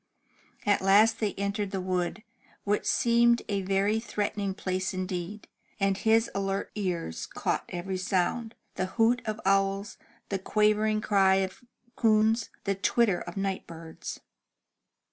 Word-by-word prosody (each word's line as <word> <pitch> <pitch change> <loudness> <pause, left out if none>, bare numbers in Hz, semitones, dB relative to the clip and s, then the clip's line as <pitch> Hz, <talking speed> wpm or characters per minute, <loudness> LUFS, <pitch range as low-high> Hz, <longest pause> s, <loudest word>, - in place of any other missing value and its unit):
At 205 -1 +3
last 210 +4 +5
they 210 -3 -1
entered 200 +1 -2
the 195 -1 -3
wood, 185 +2 -2 0.4
which 205 0 0
seemed 235 0 +3
a 200 -1 -1
very 195 +3 +1
threatening 205 -3 -2
place 185 0 -2
indeed, 185 +2 -4 0.3
and 195 -1 +2
his 225 +3 +3
alert 195 0 -2
ears 180 - -3
caught - - -2
every 185 +1 -4
sound, 195 +5 -1
— - - -44
the 185 - 0
hoot 235 +2 +4
of 215 0 -2
owls, 195 +1 +1 0.3
the 195 - -1
quavering 215 +2 +2
cry 195 -3 +4
of 190 +6 -2 0.3
coons, 220 0 +3
the 200 - 0
twitter 200 0 +2
of 175 +2 -8
night 195 -1 -2
birds. 165 -1 -8
200 Hz, 140 wpm, -28 LUFS, 190-215 Hz, 0.4 s, last